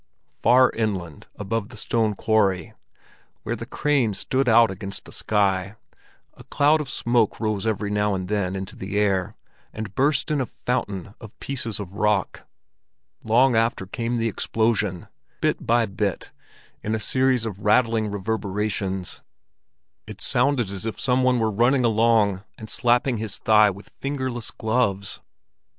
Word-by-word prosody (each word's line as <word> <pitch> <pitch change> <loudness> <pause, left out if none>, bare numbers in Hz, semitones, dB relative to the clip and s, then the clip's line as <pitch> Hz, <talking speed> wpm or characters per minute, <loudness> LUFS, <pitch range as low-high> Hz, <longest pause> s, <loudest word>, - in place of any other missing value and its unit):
Far 130 +1 +5
inland 95 -9 -3
above 105 +1 -3
the 115 - -11
stone 110 -1 0
quarry, 100 -6 +1 0.7
where - - -2
the - - -8
cranes 135 -9 +1
stood 130 -1 0
out 115 -1 +6
against 100 +1 -6
the - - -12
sky, 100 -1 0 0.6
a - - -15
cloud 150 +2 +3
of 140 - -6
smoke 120 -4 +1
rose 110 -1 -1
every 105 -1 -1
now 105 -1 +1
and 95 -1 -4
then 95 -2 -1
into 95 0 -6
the 95 +2 -4
air, 95 -3 +1 0.4
and 110 -2 -6
burst 140 +4 +1
in 145 -2 +1
a 125 - -2
fountain 100 -6 -3
of 110 -2 -12
pieces 130 -6 -3
of 95 -2 -7
rock. 105 -1 0 0.8
Long 120 +3 +4
after 115 -3 +1
came 115 +5 -3
the 115 0 0
explosion, 110 -4 -1 0.3
bit - - -1
by 120 0 +3
bit 100 -2 -3 0.5
in 110 +1 -1
a - - -2
series 130 +1 +2
of 100 -4 -5
rattling 110 0 +2
reverberations. 100 -2 -3 0.9
It - - -9
sounded 125 -5 +2
as 95 -2 -5
if 110 -1 -4
some 130 -1 +2
one 130 -1 +3
were 110 -2 +1
running 120 +4 +3
along 110 -3 +3
and 110 - -7
slapping 120 +1 +2
his 110 -1 -3
thigh 105 -1 +5
with 100 +1 -10
fingerless 130 -4 -3
gloves. 110 -4 -1
110 Hz, 150 wpm, -23 LUFS, 100-120 Hz, 0.9 s, out